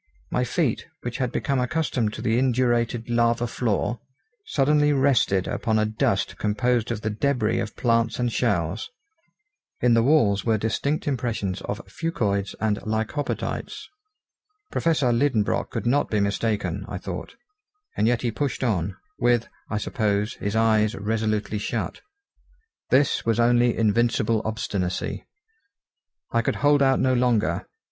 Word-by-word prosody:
My - - +1
feet, - - -1 0.2
which 120 -1 -4
had 125 -3 -1
become 135 0 0
accustomed 125 -4 0
to - - -6
the 115 +2 +2
indurated 120 -2 +1
lava 120 0 +2
floor, 115 0 -1 0.5
suddenly 150 +1 +3
rested 125 -9 +2
upon 110 -2 0
a 110 - +2
dust 105 -2 -1
composed 120 +2 +1
of 115 -3 -3
the 110 - -2
debris 115 -1 0
of 110 - -4
plants 115 -2 +1
and 120 -2 -1
shells. 90 -4 0 0.9
In 120 -1 +4
the 115 - +5
walls 115 -7 +3
were 110 -2 +2
distinct 115 +9 -1
impressions 115 -8 -2
of 100 - -5
fucoids 105 - -2
and 105 -2 0
lycopodites. 110 +7 -3 0.8
Professor 150 -7 +2
Liedenbrock 115 -4 +1
could - - -4
not 140 +4 +2
be 105 - +1
mistaken, 100 -2 -1
I 95 - -5
thought, 90 - -6 0.6
and 110 - +2
yet 120 +1 +1
he 120 - 0
pushed 135 +2 -2
on, 100 -6 -1 0.2
with, 120 -1 +2 0.2
I 110 - -1
suppose, 105 0 0
his 100 +1 -4
eyes 110 -1 +3
resolutely 110 0 -1
shut. - - -3 0.9
This 135 0 +3
was 115 0 +1
only 120 0 +3
invincible 115 0 +2
obstinacy. 100 -4 -3 1.0
I 115 - +2
could - - -1
hold 145 0 +5
out 135 -1 +4
no 130 0 +2
longer. 120 -3 +1
115 Hz, 140 wpm, -24 LUFS, 105-125 Hz, 1.0 s, the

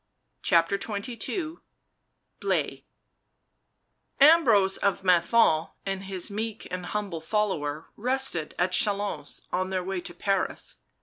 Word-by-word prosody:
CHAPTER 170 +2 +3
XXII 240 - -4 0.8
BLAISE - - -1 1.4
Ambrose 255 -11 +6
of 200 -1 0
Menthon 175 -2 +4 0.2
and 195 0 -3
his 190 0 -3
meek 220 +1 -4
and 180 -1 -4
humble 200 -6 -3
follower 160 -6 -1
rested 250 -9 -1
at 180 +1 +1
Chalons, 205 +2 -1
on 185 +1 0
their 185 -1 -1
way 190 0 -3
to 175 - -7
Paris. 195 +1 -1
195 Hz, 110 wpm, -27 LUFS, 180-215 Hz, 1.4 s, Ambrose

